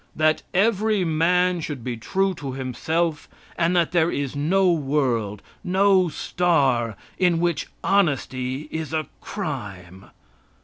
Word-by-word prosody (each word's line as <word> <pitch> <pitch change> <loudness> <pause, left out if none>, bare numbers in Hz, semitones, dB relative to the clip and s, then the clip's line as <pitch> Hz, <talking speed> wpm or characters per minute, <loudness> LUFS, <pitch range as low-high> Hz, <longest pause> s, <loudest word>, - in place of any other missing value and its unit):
That 155 0 +2
every 210 0 +2
man 175 +2 +2
should 145 -6 -5
be 125 -1 -3
true 190 - 0
to 140 -6 -6
himself, 150 +5 -2 0.3
and 170 +2 +1
that 170 -2 +2
there 170 -2 +3
is 140 -3 -3
no 180 +6 +3
world, 130 - 0 0.2
no 190 -1 +3
star, 135 - +1 0.2
in 175 -3 +3
which 170 -3 0 0.2
honesty 135 -7 0
is 160 -1 -4
a 155 -1 0 0.2
crime. 95 -1 -6
160 Hz, 125 wpm, -23 LUFS, 130-180 Hz, 0.3 s, there